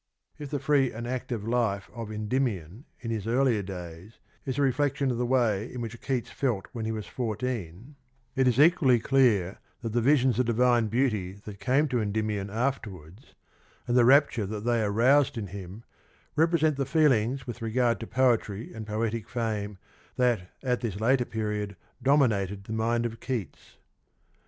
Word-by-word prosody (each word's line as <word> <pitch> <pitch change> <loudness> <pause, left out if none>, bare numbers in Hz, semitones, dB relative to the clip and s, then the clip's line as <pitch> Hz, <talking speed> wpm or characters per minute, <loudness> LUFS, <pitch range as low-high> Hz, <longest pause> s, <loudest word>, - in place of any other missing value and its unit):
"^ - - -6
If 145 - -6
the 145 - -1
free 140 -2 +2
and 115 +2 -6
active 120 -3 -4
life 115 -5 0
of 115 -3 -6
Endymion 105 - -2 0.2
in 115 -2 -4
his 110 -2 -3
earlier 120 -2 +2
days 90 +1 -9 0.3
is 130 - -2
a 145 - +2
reflection 140 0 +1
of 120 - -3
the 125 - 0
way 115 -4 +1
in 125 - -6
which 115 -1 -6
Keats 130 -4 -2
felt 120 -8 -1
when 115 -3 -5
he 110 - -1
was 110 -2 -4
fourteen, 115 - -4 0.4
it 130 -1 +3
is 125 0 +2
equally 145 -6 +5
clear 110 -8 +2 0.2
that 115 -2 -3
the 120 - +2
visions 130 -1 +3
of 125 - +2
divine 120 -1 +3
beauty 110 -6 0
that 100 -2 -9
came 130 +9 +2
to 125 -2 0
Endymion 105 -1 -2
after 115 +2 -1
wards, 90 - -14 0.5
and 120 - +1
the 125 - +6
rapture 130 -4 +4
that 105 +1 -5
they 120 -1 +2
aroused 120 +7 +3
in 110 - -3
him, 100 +2 -9 0.5
represent 160 -2 +3
the 135 - 0
feelings 135 -4 +2
with 120 -1 -7
regard 115 0 +1
to 115 - -6
poetry 120 -4 0
and 110 -1 -7
poetic 110 +1 -2
fame 105 -4 -3 0.4
that 120 -8 +1
at 125 -2 0
this 105 -4 -3
later 125 +3 +2
period 105 -2 -3 0.3
dominated 105 -9 +2
the 110 - -6
mind 115 +1 0
of 115 -1 -4
Keats. 120 -8 -5
115 Hz, 175 wpm, -27 LUFS, 105-130 Hz, 0.5 s, the